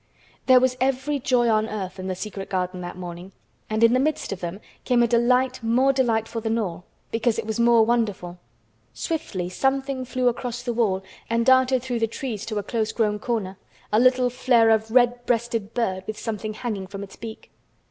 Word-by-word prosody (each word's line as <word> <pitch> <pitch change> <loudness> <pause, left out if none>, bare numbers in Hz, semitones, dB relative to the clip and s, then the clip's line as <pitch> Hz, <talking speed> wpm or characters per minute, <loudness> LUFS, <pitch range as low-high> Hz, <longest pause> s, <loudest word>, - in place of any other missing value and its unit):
There 255 -1 +8
was 255 0 +1
every 270 +2 0
joy 250 -3 +2
on 220 0 +2
earth 190 -3 -5
in 185 - -5
the 185 - -2
secret 195 0 -6
garden 185 -1 -2
that 175 0 -7
morning, 180 +1 -8 0.4
and 215 +1 0
in 230 +1 +6
the 255 - +3
midst 300 +3 -1
of 195 - -4
them 175 +2 -5 0.2
came 245 -2 +3
a - - +3
delight 250 +2 +2
more 250 +4 +3
delightful 230 -3 0
than 225 +1 0
all, 180 -5 -3 0.3
because 225 0 +1
it 230 - -3
was 220 +1 -3
more 235 -1 +5
wonderful. 205 -7 -1 0.6
Swiftly 195 - -3
something 270 +6 -1
flew 255 0 -1
across 245 0 -2
the 240 -1 -2
wall 200 -5 +1 0.3
and 230 0 +1
darted 260 -1 +4
through 250 -2 -2
the 225 - +1
trees 225 -2 -5
to 215 - -3
a 205 - -1
close 220 +1 -1
grown 210 -2 0
corner, 205 -5 -3 0.3
a 215 - +5
little 250 0 +4
flare 245 -3 +4
of 220 0 +2
red 245 0 +3
breasted 230 -3 -1
bird 190 -6 -1
with 215 -1 -4
something 215 -1 -4
hanging 210 -5 -4
from 195 +1 -7
its 195 - -11
beak. 225 -1 -9
230 Hz, 200 wpm, -24 LUFS, 205-250 Hz, 0.6 s, There